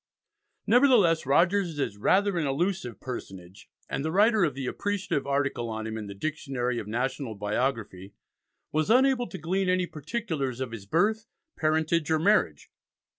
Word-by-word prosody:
Nevertheless, 225 - +4
Rogers 175 +3 +2
is 135 -8 -2
rather 190 - +2
an 155 - 0
elusive 170 -1 -2
personage, 95 -7 -8 0.2
and - - -3
the 160 - -1
writer 210 +3 +4
of 150 -6 0
the 135 -1 -4
appreciative 195 -4 -2
article 140 -4 -1
on 110 0 -4
him 110 0 -4
in 110 -2 -5
the 100 - -8
"Dictionary 125 -2 -2
of 105 - -7
National 125 +1 -2
Biography" 105 -2 -3 0.6
was 155 +4 0
unable 255 0 +4
to - - -7
glean 185 +4 -1
any 185 0 +2
particulars 155 - -4
of 130 -3 -3
his 105 -4 -8
birth, 215 - +1 0.3
parentage, 160 +1 +1
or 160 - +3
marriage. 205 +7 +1
155 Hz, 155 wpm, -27 LUFS, 120-190 Hz, 0.6 s, Nevertheless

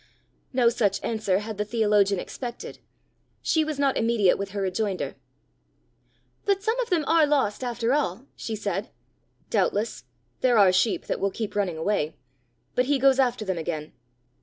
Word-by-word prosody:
No 245 -2 +4
such 220 -5 +1
answer 215 -5 0
had 210 0 -5
the - - +2
theologian 210 -3 +2
expected; 240 +3 -7 0.6
she 315 - +2
was 310 -2 -3
not 280 -1 +2
immediate 225 -5 +3
with 200 0 -4
her 200 0 -4
rejoinder. 195 0 -2 1.3
"But 395 -1 +1
some 450 +3 0
of - - -1
them 330 -5 +1
are 325 -2 +4
lost 265 -6 +1
after 240 0 0
all!" 265 -5 -1
she 225 - -4
said. 205 -1 -3 0.6
"Doubtless; 205 - 0 0.3
there 250 -2 +3
are 195 -3 +7
sheep 195 +4 +1
that - - -2
will 200 - +1
keep 210 +1 -5
running 190 -5 0
away. 160 -3 -1 0.6
But 250 - +2
he 285 +2 +2
goes 270 0 +4
after 245 -4 +1
them 190 -3 -2
again." 155 -2 -4
220 Hz, 160 wpm, -26 LUFS, 200-260 Hz, 1.3 s, are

